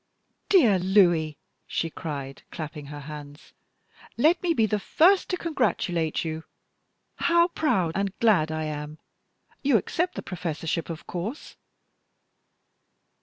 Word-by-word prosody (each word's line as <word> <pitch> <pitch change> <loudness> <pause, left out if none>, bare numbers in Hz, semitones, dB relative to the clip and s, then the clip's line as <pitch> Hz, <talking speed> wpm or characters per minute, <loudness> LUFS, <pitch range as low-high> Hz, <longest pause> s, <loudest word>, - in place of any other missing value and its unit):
"Dear 240 - +5
Louis," 175 -5 +3 0.3
she 165 - -2
cried, 140 -5 -6
clapping 150 -3 -7
her 145 0 -8
hands, 145 0 -10 0.6
"let 320 +8 +4
me 355 - +1
be 225 - +4
the 210 0 0
first 365 - +4
to 365 - 0
congratulate 180 - 0
you! 160 0 -4 0.7
How 340 +1 +3
proud 195 - +1
and 195 +1 -1
glad 185 -9 +3
I 155 0 -2
am! 150 0 -5 0.6
You 275 -5 +4
accept 350 - -1
the - - -5
professorship, 165 -2 -3
of 165 -1 -6
course?" 205 - -5
175 Hz, 120 wpm, -26 LUFS, 155-250 Hz, 0.7 s, Dear